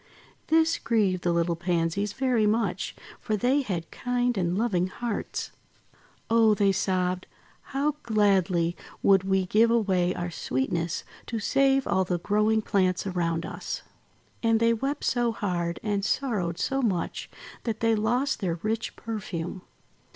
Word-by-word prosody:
This 325 +1 +3
grieved 200 -6 +1
the 175 - +1
little 170 0 +1
Pansies 175 +4 -1
very 250 -5 +2
much 210 -4 0 0.2
for 215 - -1
they 260 +6 +2
had 180 -10 -4
kind 245 0 0
and 180 -2 0
loving 195 -6 +1
hearts. 230 +3 -4 0.8
:'Oh!' 225 -1 +5
they 200 -1 +3
sobbed, 185 -1 0 0.4
"how 280 +3 0
gladly 190 -6 +2 0.3
would 195 -1 +5
we 190 -1 +1
give 220 +5 +4
away 190 -6 +2
our 175 0 -3
sweetness 165 +4 -2 0.2
to 230 - -3
save 270 +5 +2
all 190 - +2
the 180 -1 -1
growing 215 +4 +1
plants 185 -2 +1
around 170 -3 -1
us!' - - -5 0.6
And 225 -1 +3
they 230 0 +4
wept 275 +5 -2
so 240 -2 +1
hard 175 -5 -2
and 205 -2 0
sorrowed 200 -9 -1
so 270 +9 0
much, 195 -8 -1 0.4
that 225 -2 -2
they 230 0 +3
lost 245 +7 +1
their 175 -4 -1
rich 220 +1 -2
perfume. 185 -5 -5
205 Hz, 145 wpm, -27 LUFS, 180-230 Hz, 0.8 s, Oh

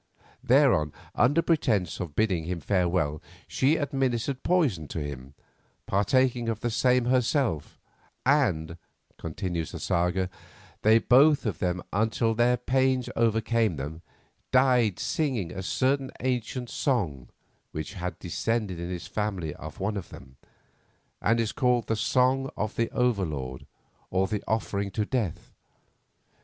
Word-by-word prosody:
Thereon, 120 - +4 0.2
under 145 +7 +3
pretence 120 - +1
of 85 -5 -5
bidding 95 -7 +1
him 90 0 -3
farewell, 85 -6 0 0.3
she 140 +4 +2
administered 135 -3 -1
poison 135 - +1
to 80 - -5
him, 70 -2 -7 0.5
partaking 120 +4 +2
of 110 -1 -3
the 120 - -1
same 125 +1 +3
herself; 125 - +1 0.5
"and," 95 - +2 0.4
continues 85 0 -3
the - - -5
saga, 90 +2 0 0.5
"they 110 +1 +6
both 135 +5 +5
of 105 - -2
them, 90 -1 -1
until 110 +2 +1
their 120 +2 +3
pains 130 +1 +1
overcame 115 -3 +2
them, 75 +4 -6 0.5
died 125 -6 +4
singing 130 - -1
a 95 - -5
certain 135 +7 0
ancient 125 -1 -2
song 80 - -1 0.4
which 80 +4 -5
had 90 -2 -4
descended 100 +1 -2
in 85 0 -4
the 90 - -2
family 95 -4 -3
of - - -10
one 105 +2 -1
of 95 - -6
them, 65 -1 -13 0.9
and 115 +3 +2
is 110 -2 0
called 125 -3 +1
the 110 - 0
Song 130 +4 +2
of 105 0 -2
the 115 - 0
Over 125 -5 +1
Lord, 65 -6 -5 0.4
or 95 +1 +1
the 100 +1 -3
Offering 100 -2 -1
to 105 - 0
Death. 110 -9 -3
110 Hz, 135 wpm, -27 LUFS, 90-125 Hz, 0.9 s, they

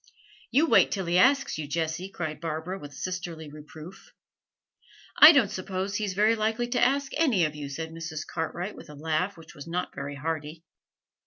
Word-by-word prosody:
'You 290 +5 +4
wait - - +5
till 195 -3 -2
he 175 +1 +2
asks 275 - +3
you, 150 - -4
Jessie,' 165 +4 -2
cried 160 -5 -5
Barbara, 165 +4 -4
with 145 -1 -10
sisterly 165 -1 -5
reproof. 155 +4 -12 1.1
'I 305 - +12
don't 255 - +3
suppose 190 0 -4
he's 205 -4 -2
very 215 +3 +4
likely 225 +2 -1
to 245 - +1
ask 275 +2 +2
any 255 - +3
of 155 - -3
you,' 145 -2 -7
said 160 +3 -5
Mrs. 160 -1 -6
Cartwright, 175 +4 -4
with - - -12
a 150 - -10
laugh 160 +6 -1
which 165 -1 -13
was 145 +2 -10
not 175 +2 -3
very 140 +1 -6
hearty. 155 +2 -4
170 Hz, 180 wpm, -27 LUFS, 155-200 Hz, 1.1 s, I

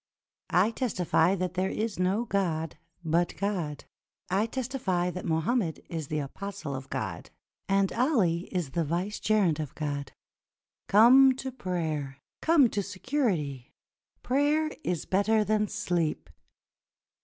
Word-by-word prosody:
I 190 +5 +3
testify 190 -7 +1
that 180 -2 -2
there 185 +1 0
is 215 -3 -3
no 190 +6 +1
God 165 -7 -1 0.3
but 170 +2 +1
God; 180 -8 -2 0.5
I 200 +4 +2
testify 230 -9 -1
that 180 +1 -6
Mohammed 165 +3 0
is 160 -4 -4
the 155 - -2
apostle 155 +1 -5
of 130 0 -6
God, - - -4 0.4
and 195 0 +2
Ali 210 - +2
is 175 -8 -2
the 170 +2 0
vicegerent 180 +1 0
of 150 -4 -5
God. 145 -2 -4 0.7
Come 255 +5 +7
to 265 0 -5
prayer! 160 - -3 0.2
Come 315 -5 +5
to 205 - 0
security! 185 - -2 0.5
Prayer 295 +4 +2
is 175 -3 -2
better 215 +3 +2
than 210 0 +1
sleep." 170 -5 -2
185 Hz, 125 wpm, -28 LUFS, 160-220 Hz, 0.7 s, Come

